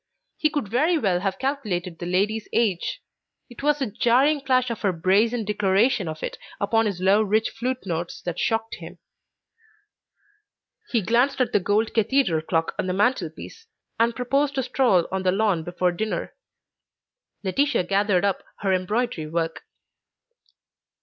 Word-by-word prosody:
He 305 - +1
could 290 -7 -2
very 300 - +2
well 190 - +1
have 190 0 -2
calculated 195 - -3
the 175 - -5
lady's 210 +5 0
age. 230 - 0 0.5
It 240 - -10
was 295 +1 +2
the 275 - -1
jarring 250 +7 +2
clash 255 -2 +1
of 230 - -5
her 200 - +2
brazen 210 +7 +1
declaration 205 +1 +2
of 155 0 -6
it - - -5 0.2
upon 225 +2 +2
his 195 -4 -3
low 195 +3 +4
rich 215 +1 +1
flute 250 +1 -3
notes 170 -1 -4
that 175 -2 -4
shocked 225 0 -1
him. 175 +1 -10 1.9
He 230 -4 +1
glanced 245 +8 +2
at 250 -3 +1
the - - +4
gold 205 +4 0
cathedral 220 - +2
clock 165 0 -1
on - - -1
the 180 - 0
mantel 205 -3 +1
piece, 450 - -12 0.3
and 230 0 +2
proposed 275 +3 0
a 265 - +1
stroll 245 -8 +2
on 190 0 -1
the 185 -1 +2
lawn 195 -4 +1
before 175 +1 0
dinner. 215 +5 -3 1.1
Laetitia 255 +4 +1
gathered 200 0 +1
up 200 -2 0 0.2
her 195 -2 +1
embroidery 185 -2 -1
work. 165 +1 -3
210 Hz, 155 wpm, -24 LUFS, 185-250 Hz, 1.9 s, low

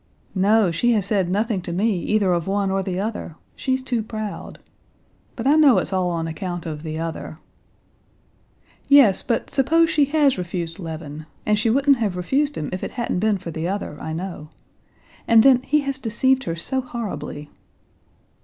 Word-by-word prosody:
"No, 200 0 +3
she 240 +8 +2
has 210 -4 +1
said 200 -4 +1
nothing 205 +1 0
to 175 - -6
me 195 +2 +1
either 200 -1 +1
of 170 0 -1
one 195 0 0
or 195 0 +1
the 185 -1 -3
other; 210 -6 -4 0.2
she's 260 0 -1
too 245 -3 -1
proud. 215 -1 -6 0.8
But 230 - -5
I 280 - +5
know 300 -5 +6
it's - - -1
all 185 -1 +1
on 165 -1 -2
account 175 +1 -5
of 155 -2 -5
the 155 -1 -5
other." 165 -1 -5 1.5
"Yes, 275 -9 +6
but 230 - -2
suppose 325 +4 +3
she 295 -3 +3
has 285 -5 +2
refused 170 -1 -4
Levin, 155 -3 -7 0.2
and 210 0 +2
she 225 - +1
wouldn't 275 +3 +4
have 205 -6 -1
refused 280 +11 0
him 150 - -4
if 185 - -4
it - - -2
hadn't 235 -6 -1
been 215 0 +2
for 175 -2 -7
the 160 +1 -3
other, 195 -5 -3
I 160 - -5
know. 165 -2 -6 0.8
And 225 -1 +6
then, 260 -2 +6
he 295 +3 +1
has 275 -2 -3
deceived 260 +3 +1
her 165 - -2
so 260 +10 -2
horribly." 200 - -6
205 Hz, 180 wpm, -22 LUFS, 175-250 Hz, 1.5 s, know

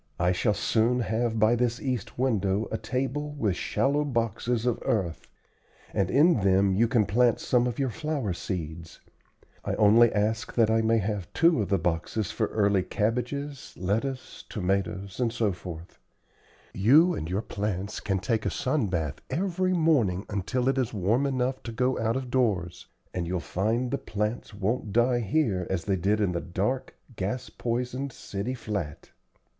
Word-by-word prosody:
"I 90 +1 +3
shall 105 +3 +1
soon 115 +3 +2
have 115 0 0
by 110 +2 +4
this 120 0 0
east 125 -6 -3
window 110 -5 +1
a 110 - 0
table 135 +3 -2
with 110 -11 0
shallow 145 +9 +1
boxes 120 -2 -1
of 120 -2 +1
earth, 90 -7 -1 0.7
and 95 -2 +1
in 150 - +5
them 95 0 +3
you 115 +5 +3
can 115 -3 +3
plant 120 +3 +3
some 125 -1 +2
of 120 - -3
your 135 -3 0
flower 150 - -2
seeds. 85 -2 -6 0.6
I - - -1
only 110 +3 +6
ask 110 +2 -1
that 115 -2 +4
I 110 0 +3
may 115 +1 +3
have 105 -3 -2
two 165 -7 +4
of 100 - -2
the 100 - +3
boxes 90 +5 -1
for 110 -2 0
early 100 -3 +2
cabbages, 125 +8 -3
lettuce, 115 +8 -3
tomatoes, 95 0 -2
etc. 115 -5 0 1.2
You 150 - +5
and 80 - -4
your 95 +4 -1
plants 100 -1 -3
can 95 -2 -1
take 110 +3 -1
a - - +2
sun 130 -3 0
bath 80 -6 -2
every 185 0 0
morning 130 - +2
until 120 +5 -1
it 135 0 +2
is 120 -3 -1
warm, 110 +9 +2
enough 130 -1 -1
to 115 - -6
go 125 +3 0
out 115 +1 0
of 130 -2 -4
doors, 100 -10 0 0.3
and 85 -2 -2
you'll 90 +1 -1
find 115 +8 -1
the - - -1
plants 105 +2 -3
won't 105 +2 -2
die 120 +2 +3
here 105 - 0
as 95 -3 -2
they 100 - +1
did 100 +4 +1
in 100 -4 +1
the 85 -1 -2
dark, 100 +9 -2 0.2
gas 105 +7 -3
poisoned 125 +3 -2
city 105 +3 -4
flat." 100 - -5
110 Hz, 165 wpm, -27 LUFS, 100-125 Hz, 1.2 s, only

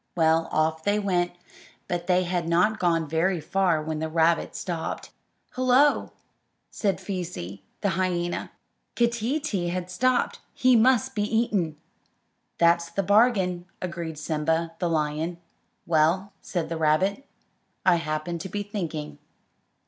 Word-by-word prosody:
Well, 165 -1 +3
off 160 +1 +1
they 205 +1 +2
went; 180 -4 0 0.5
but 175 -1 -3
they 180 0 +3
had 175 -2 -2
not 210 +6 +3
gone 165 -3 +1
very 165 +4 +1
far 175 -2 +1
when 155 0 -3
the 160 0 -2
rabbit 165 +1 +2
stopped. 170 -3 -4 0.4
"Hullo!" 255 +3 +3 0.6
said 200 -3 0
Feesee, 170 - -5 0.2
the 200 - +1
hyena; 175 -1 -1 0.5
"Keeteetee 235 - 0
has 180 0 -4
stopped. 255 +3 +1 0.2
He 255 0 +4
must 235 0 +4
be 210 - -1
eaten." 210 -7 0 0.8
"That's 170 0 +3
the 195 +4 -1
bargain," 190 -4 +3
agreed 170 -3 -5
Simba, 160 +2 -1
the 175 - 0
lion. 155 +2 -1 0.5
"Well," 170 +5 +2
said 170 -4 -3
the 165 - -3
rabbit, 160 - +2 0.6
"I 180 -2 +5
happened 155 +1 -3
to 190 - -6
be 205 +2 -3
thinking." 170 -7 -5
175 Hz, 130 wpm, -26 LUFS, 160-200 Hz, 0.8 s, I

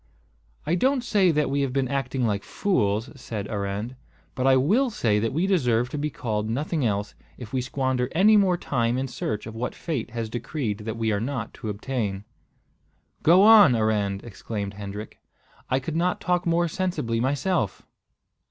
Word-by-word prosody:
"I 160 - 0
don't 260 +8 +2
say 200 -6 +3
that 150 -3 +1
we 140 0 +1
have 135 -2 -1
been 135 -1 +1
acting 135 -1 -1
like 105 -3 -1
fools," 110 - 0
said 110 -6 -6
Arend; 105 +4 -3 0.4
"but 130 0 0
I 130 -1 +6
will 215 - +3
say 110 - +1
that 115 +1 -1
we 165 +7 0
deserve 125 - +2
to 150 - -5
be 150 +1 -1
called 110 -6 -3
nothing 150 +5 -1
else, 105 -2 -1 0.2
if 120 -2 -10
we 130 - +1
squander 130 -1 -1
any 205 +6 +5
more 190 -4 +4
time 120 -6 0
in 135 +1 -1
search 110 -4 -4
of 110 - -7
what 115 +2 -4
fate 145 -9 -3
has 115 -1 -4
decreed 115 -1 -3
that 110 +1 -5
we 110 -1 0
are 100 0 0
not 120 -2 -3
to 115 -5 -6
obtain." 105 -2 -3 1.0
"Go 175 +5 +6
on, 210 - +8
Arend!" 105 -3 0
exclaimed 100 -2 -5
Hendrik. 100 +1 -8 0.5
"I 130 - +2
could 150 +4 -5
not 175 +2 +1
talk 180 +1 0
more 170 +1 +2
sensibly 160 -10 -2
myself." 140 - 0
125 Hz, 180 wpm, -25 LUFS, 110-160 Hz, 1.0 s, on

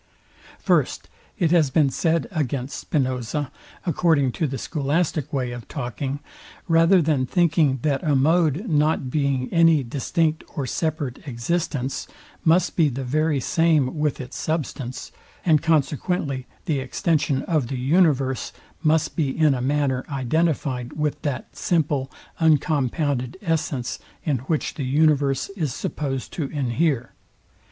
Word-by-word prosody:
First, - - 0 0.3
It 170 -6 +2
has 165 -5 +4
been 140 0 +3
said 165 +3 +1
against 140 -5 -2
Spinoza, 130 0 -2 0.3
according 160 -5 +2
to 155 +6 -1
the 135 0 -4
scholastic 150 +1 -1
way 130 -3 -1
of 120 -2 -8
talking, 135 +1 -4 0.5
rather 165 +2 +5
than 145 -4 +1
thinking, 160 -4 +3
that 140 -3 +1
a 150 -4 +1
mode, 160 - +2
not 150 -4 +1
being 140 -3 0
any 165 -4 +5
distinct 155 +5 -1
or 140 - -2
separate 150 -1 -3
existence, 135 +1 -2 0.4
must 170 +2 +3
be 160 -4 +4
the 135 +1 -4
very 150 +3 +1
same 155 -1 +2
with 150 -2 0
its 125 - -7
substance, 140 -5 -3 0.3
and 155 -4 +4
consequently 150 -3 0 0.2
the 155 -6 0
extension 145 0 0
of 155 -7 0
the 130 - -3
universe, 135 -2 +2 0.3
must 155 0 +2
be 150 -5 +1
in 150 +1 +3
a 125 - -2
manner 135 -1 0
identifyed 135 -2 -1
with 150 -1 -2
that, 135 -5 -4
simple, 145 -6 0 0.3
uncompounded 145 -3 +1
essence, 155 -7 -1 0.2
in 145 -5 0
which 155 -3 0
the 145 - -4
universe 140 0 +2
is 160 -10 -3
supposed 135 -4 -3
to 160 - -2
inhere. 135 -1 -1
145 Hz, 130 wpm, -23 LUFS, 130-160 Hz, 0.5 s, rather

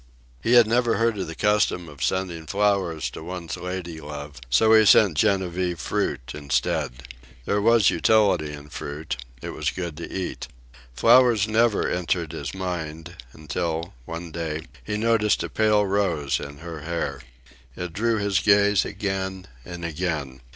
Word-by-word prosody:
He 115 - +1
had 120 -2 +8
never 120 +1 +2
heard 115 -2 +1
of 95 - -3
the 80 - -7
custom 105 -4 +1
of 75 -3 -7
sending 90 -4 -2
flowers 100 -5 +1
to - - -8
one's 90 -1 -5
lady 90 -2 -6
love, 75 -2 -8
so 110 - +5
he 110 0 +7
sent 100 -4 +6
Genevieve 90 +1 +1
fruit 65 -3 -2
instead. 65 -3 -1 0.4
There 100 0 +1
was 115 -1 +5
utility 95 -5 +3
in 75 0 -10
fruit. 75 -2 -5 0.3
It - - -4
was - - -1
good 85 -4 -5
to 85 - -7
eat. 95 -2 -4 0.5
Flowers 115 - +5
never 110 0 +2
entered 85 -2 -1
his 70 +5 -5
mind, 85 -2 -5 0.2
until, 80 +3 -3
one 85 +2 -6
day, 80 -1 -4 0.2
he 105 - -3
noticed 110 -1 +2
a - - -4
pale 105 -1 +3
rose 90 -9 0
in 70 -1 -8
her 80 0 -8
hair. 75 -3 -3 0.5
It 90 -2 -5
drew 115 +4 +1
his 100 -2 +1
gaze 100 -2 +4
again 95 -2 -3 0.2
and 85 +5 -7
again. 75 -6 -3
90 Hz, 155 wpm, -24 LUFS, 80-105 Hz, 0.5 s, had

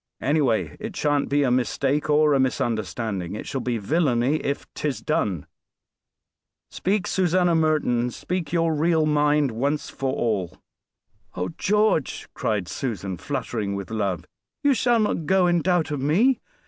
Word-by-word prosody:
"Anyway, 135 -6 +1
it 215 -2 -6
shan't 145 -3 +1
be 145 +1 +2
a 130 - +2
_mis_take 135 +4 0
or 150 0 +4
a 135 - +3
_mis_understanding; 110 -6 -1
it - - -7
shall 135 - -3
be 120 -1 -1
villainy 135 - +1
if 140 -2 -3
'tis 145 -3 -2
done. 100 - -1 1.3
Speak, 195 0 0
Susanna 180 -1 +2
Merton, 155 -6 +2
and 120 +1 -1
speak 175 +3 -4
your 165 -1 +2
real 160 +1 +2
mind 150 -2 +2
once 140 +6 -2
for 135 -1 -2
all." 105 -9 -1 0.8
"Oh! 90 +1 -2
George," 210 -7 +1
cried 105 -5 -1
Susan, 100 -7 -4
fluttering 115 - -3
with 100 +1 -6
love; 100 -5 -2 0.4
"you 285 -1 +5
shall 240 -2 +2
not 210 -7 0
go 190 -1 +4
in 175 -1 +2
doubt 175 -2 +1
of 145 -3 -2
me. 210 - +3
145 Hz, 150 wpm, -24 LUFS, 120-165 Hz, 1.3 s, you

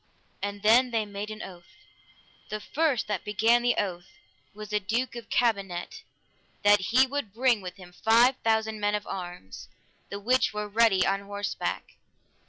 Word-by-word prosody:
And 205 0 -4
then 240 +4 +5
they 225 -2 0
made 205 +1 -6
an 215 0 -7
oath. 175 -2 -12 0.7
The 215 - -3
first 290 0 0
that 205 -4 -3
began 225 +4 +3
the 245 0 +2
oath 175 -3 -4 0.3
was 210 0 -10
the 210 0 +1
Duke 230 +6 -2
of 235 -2 -9
Cambenet, 200 -7 -1 0.6
that 205 0 +6
he 260 +3 +5
would 265 -6 -5
bring 240 -3 +2
with 180 -1 -7
him 180 -2 -14
five 235 +7 +4
thousand 220 -1 0
men 205 0 +1
of 210 - -4
arms, 175 - -8 0.4
the 200 - -5
which 245 +1 +1
were 210 0 -3
ready 210 -3 +3
on 195 0 +1
horseback. 205 0 -4
210 Hz, 165 wpm, -27 LUFS, 200-235 Hz, 0.7 s, that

